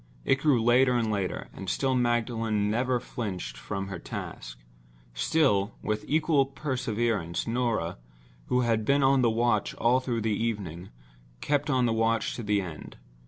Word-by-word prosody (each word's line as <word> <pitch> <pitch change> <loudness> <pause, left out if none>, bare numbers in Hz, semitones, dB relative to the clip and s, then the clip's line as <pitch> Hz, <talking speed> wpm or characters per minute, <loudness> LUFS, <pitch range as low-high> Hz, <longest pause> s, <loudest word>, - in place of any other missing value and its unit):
It 135 - +3
grew 140 -4 +3
later 125 +2 +4
and 115 -2 +1
later; 100 -3 -2
and 95 - -6
still 135 -1 +1
Magdalen 115 -4 +1
never 125 +2 +1
flinched 95 - -5
from 95 +9 -5
her 95 -3 -5
task—still, - - -2
with 105 0 -1
equal 155 -2 +2
perseverance, 120 - -2
Norah, 115 - -1 0.5
who 125 - +2
had 115 -2 +1
been 140 +4 +3
on 135 0 +4
the 120 - +4
watch 115 -2 +1
all 120 +3 +3
through 120 -3 -2
the 110 0 0
evening, 100 -6 -3 0.5
kept 145 - 0
on 130 -3 +3
the 115 - +1
watch 115 -1 +1
to - - -4
the 105 -2 +1
end. 85 -5 -8
115 Hz, 155 wpm, -28 LUFS, 100-125 Hz, 0.5 s, later